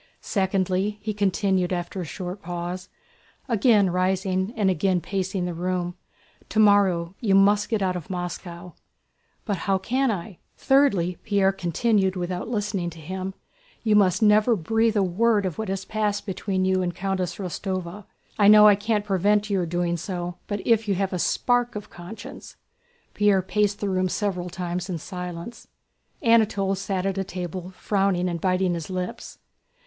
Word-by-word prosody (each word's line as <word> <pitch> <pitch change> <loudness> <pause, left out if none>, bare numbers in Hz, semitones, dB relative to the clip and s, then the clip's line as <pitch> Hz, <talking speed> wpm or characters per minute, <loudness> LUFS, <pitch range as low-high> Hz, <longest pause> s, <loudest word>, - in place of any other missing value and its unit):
"Secondly," 190 +1 0
he 215 0 -2
continued 190 -2 +1
after 180 +1 -3
a - - -4
short 180 +4 -6
pause, 175 +1 -5 0.6
again 215 -5 +3
rising 185 +2 0
and 205 -3 +2
again 185 +1 +1
pacing 190 0 -2
the 175 - -3
room, 175 +1 -2 0.5
"tomorrow 200 -5 +3
you 200 -5 +2
must 205 +1 +4
get 220 -4 0
out 185 -1 0
of 175 -4 -6
Moscow." 175 -1 -6 0.7
"But 205 -3 -1
how 195 - +4
can 255 +7 0
I?..." 195 -2 -4 0.2
"Thirdly," 200 -11 +2
Pierre 200 -2 +2
continued 190 +2 +1
without 180 +1 -3
listening 205 -6 -2
to 165 -1 -12
him, 185 +4 -5 0.5
"you 215 -2 +3
must 190 -1 +3
never 215 +2 +5
breathe 225 +4 +1
a 200 - +3
word 205 +3 +2
of 180 -1 -4
what 220 -3 -3
has 195 0 -3
passed 210 -2 -1
between 190 -1 -2
you 190 0 +2
and 175 -2 -2
Countess 185 -2 -2
Rostóva. 185 0 -5 0.3
I 205 - +6
know 210 0 +9
I 210 - +8
can't 210 +1 -1
prevent 205 +2 +1
your 185 -3 +1
doing 175 0 -1
so, 175 0 -5
but 205 -1 -4
if 225 -2 +3
you 200 - +1
have 195 0 -1
a 180 - -1
spark 245 +5 +1
of 210 - -7
conscience..." 180 +5 -10 0.6
Pierre 205 -2 +3
paced 205 +1 0
the 205 - -2
room 185 0 +1
several 180 -3 -2
times 180 0 -4
in 175 - -2
silence. 180 +5 -7 0.6
Anatole 215 -4 +3
sat 195 -1 -2
at 195 0 -1
a - - 0
table 180 -1 -6
frowning 195 -3 +1
and 170 -2 -3
biting 185 -1 +1
his 170 0 -5
lips. 185 -1 -5
190 Hz, 165 wpm, -24 LUFS, 180-205 Hz, 0.7 s, know